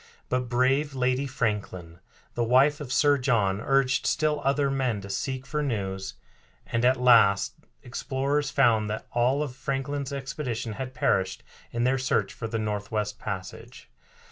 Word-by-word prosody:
But 125 Hz, -1 st, -1 dB
brave 135 Hz, +4 st, +1 dB
Lady 130 Hz, +2 st, +1 dB
Franklin, 105 Hz, -, -3 dB, 0.3 s
the 120 Hz, -, 0 dB
wife 135 Hz, +5 st, +4 dB
of 135 Hz, -4 st, -6 dB
Sir 145 Hz, 0 st, +4 dB
John, 105 Hz, -6 st, +1 dB
urged 135 Hz, 0 st, +2 dB
still 155 Hz, -1 st, +1 dB
other 140 Hz, 0 st, +2 dB
men 130 Hz, -6 st, 0 dB
to 100 Hz, 0 st, -7 dB
seek 130 Hz, +6 st, -3 dB
for 150 Hz, +1 st, -2 dB
news, 95 Hz, -8 st, -3 dB, 0.5 s
and 115 Hz, 0 st, -1 dB
at 130 Hz, +1 st, +4 dB
last 110 Hz, -3 st, +5 dB, 0.3 s
explorers 135 Hz, +3 st, -1 dB
found 115 Hz, -7 st, +3 dB
that 110 Hz, -, -4 dB
all 125 Hz, +5 st, +2 dB
of 130 Hz, -4 st, -6 dB
Franklin's 140 Hz, +1 st, -3 dB
expedition 130 Hz, -4 st, -4 dB
had 130 Hz, +2 st, -6 dB
perished 95 Hz, -4 st, 0 dB, 0.3 s
in 120 Hz, 0 st, -1 dB
their 130 Hz, +2 st, +2 dB
search 105 Hz, -6 st, 0 dB
for 115 Hz, -, -5 dB
the 115 Hz, 0 st, -3 dB
Northwest 105 Hz, 0 st, -3 dB
Passage. 95 Hz, -3 st, -7 dB
125 Hz, 150 wpm, -27 LUFS, 110-135 Hz, 0.5 s, last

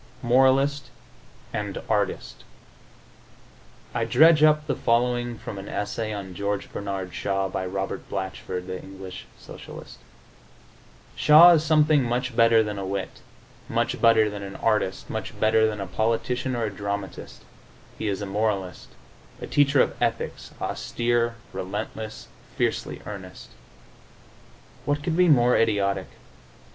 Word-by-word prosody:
XVIII 120 Hz, -, -6 dB
MORALIST 135 Hz, +1 st, +3 dB, 0.6 s
AND -, -, -3 dB
ARTIST -, -, -2 dB, 1.5 s
I 115 Hz, -, 0 dB
dredge 155 Hz, +7 st, +5 dB
up 150 Hz, 0 st, +4 dB
the 150 Hz, -, -1 dB
following 120 Hz, 0 st, 0 dB
from 100 Hz, -, -7 dB
an 95 Hz, -, -8 dB
essay 110 Hz, +1 st, -3 dB
on 100 Hz, -3 st, -6 dB
George 100 Hz, +2 st, -3 dB
Bernard 95 Hz, -3 st, -4 dB
Shaw 95 Hz, 0 st, -1 dB
by 95 Hz, 0 st, -3 dB
Robert 95 Hz, +1 st, -4 dB
Blatchford, 95 Hz, -1 st, -4 dB
the 95 Hz, 0 st, -6 dB
English 95 Hz, -1 st, -10 dB
Socialist: -, -, -11 dB, 1.2 s
"Shaw 160 Hz, +4 st, +8 dB
is 160 Hz, -3 st, +4 dB
something 155 Hz, -1 st, +4 dB
much 120 Hz, 0 st, -2 dB
better 115 Hz, -1 st, +5 dB
than 105 Hz, -2 st, -4 dB
a -, -, -4 dB
wit, 95 Hz, 0 st, -4 dB, 0.5 s
much -, -, -1 dB
better 115 Hz, -2 st, +5 dB
than 105 Hz, -1 st, -5 dB
an 100 Hz, 0 st, -7 dB
artist, -, -, 0 dB
much -, -, -6 dB
better 110 Hz, 0 st, +4 dB
than 105 Hz, -1 st, -4 dB
a 100 Hz, -, -3 dB
politician 115 Hz, +6 st, -1 dB
or 120 Hz, -, -1 dB
a 105 Hz, -, -1 dB
dramatist; 100 Hz, 0 st, -6 dB, 0.6 s
he 110 Hz, -, -2 dB
is 100 Hz, 0 st, -2 dB
a -, -, -3 dB
moralist, 100 Hz, -2 st, -2 dB, 0.5 s
a -, -, -6 dB
teacher 145 Hz, -1 st, +4 dB
of -, -, -3 dB
ethics, -, -, -2 dB
austere, 120 Hz, 0 st, -1 dB, 0.2 s
relentless, 105 Hz, +3 st, -5 dB, 0.3 s
fiercely -, -, -2 dB
earnest." -, -, -9 dB, 1.3 s
What 145 Hz, 0 st, -1 dB
could 160 Hz, 0 st, -1 dB
be 180 Hz, +1 st, +4 dB
more 125 Hz, -5 st, +5 dB
idiotic? 100 Hz, -4 st, +1 dB
110 Hz, 135 wpm, -25 LUFS, 100-125 Hz, 1.5 s, Shaw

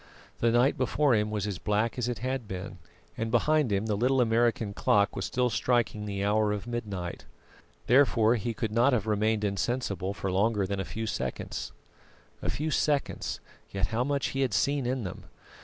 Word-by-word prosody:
The 115 Hz, -, +3 dB
night 120 Hz, +4 st, +3 dB
before 140 Hz, +1 st, +2 dB
him 105 Hz, -1 st, +2 dB
was 105 Hz, -2 st, -2 dB
as 100 Hz, -4 st, -4 dB
black 105 Hz, +2 st, 0 dB
as 125 Hz, -2 st, -1 dB
it 120 Hz, -, -2 dB
had 130 Hz, -3 st, -2 dB
been, 95 Hz, 0 st, -6 dB, 0.4 s
and 115 Hz, 0 st, -2 dB
behind 145 Hz, +2 st, +2 dB
him 100 Hz, +1 st, +1 dB
the 110 Hz, -, 0 dB
little 130 Hz, +5 st, +2 dB
American 115 Hz, -3 st, +2 dB
clock 100 Hz, +1 st, +2 dB
was -, -, -2 dB
still 125 Hz, -1 st, 0 dB
striking 110 Hz, 0 st, 0 dB
the 100 Hz, -1 st, -2 dB
hour 105 Hz, 0 st, +2 dB
of 105 Hz, 0 st, -3 dB
midnight. 105 Hz, -7 st, -5 dB, 0.6 s
Therefore 120 Hz, -3 st, +4 dB
he 115 Hz, 0 st, -2 dB
could 110 Hz, 0 st, -2 dB
not 120 Hz, +5 st, +3 dB
have 110 Hz, -4 st, +1 dB
remained 110 Hz, 0 st, +1 dB
insensible 100 Hz, -2 st, -1 dB
for 95 Hz, -2 st, -3 dB
longer 100 Hz, +1 st, +2 dB
than 100 Hz, +1 st, -3 dB
a 95 Hz, -, -2 dB
few 110 Hz, +4 st, -4 dB
seconds. 110 Hz, -, -4 dB, 0.7 s
A -, -, -2 dB
few 155 Hz, +2 st, -2 dB
seconds, 145 Hz, -1 st, 0 dB, 0.3 s
yet 95 Hz, -1 st, -1 dB
how 120 Hz, +2 st, +2 dB
much 140 Hz, 0 st, 0 dB
he 135 Hz, -, -2 dB
had 130 Hz, -, +1 dB
seen 140 Hz, -3 st, +1 dB
in 130 Hz, -1 st, -1 dB
them. 90 Hz, -, -7 dB
110 Hz, 190 wpm, -28 LUFS, 100-125 Hz, 0.7 s, Therefore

